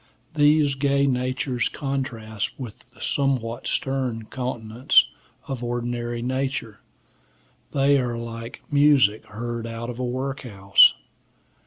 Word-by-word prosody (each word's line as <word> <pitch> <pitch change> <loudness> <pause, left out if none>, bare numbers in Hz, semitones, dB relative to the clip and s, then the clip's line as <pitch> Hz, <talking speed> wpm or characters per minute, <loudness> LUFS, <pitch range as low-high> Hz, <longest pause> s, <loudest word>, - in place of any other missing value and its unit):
These 150 -1 +4
gay 140 0 +2
natures 130 -1 0
contrast 120 -7 -4
with 120 -6 -9
the - - -12
somewhat 125 -5 -1
stern 130 -4 -1
countenance 120 -1 +2 0.4
of 130 -3 -4
ordinary 120 0 -3
nature; 130 -3 -2 0.9
they 140 0 +3
are 120 -2 -2
like 115 0 -7
music 140 -7 +4
heard 115 +1 -5
out 115 +1 -5
of 120 - -9
a - - -1
workhouse. 125 -7 +3
125 Hz, 110 wpm, -24 LUFS, 115-135 Hz, 0.9 s, These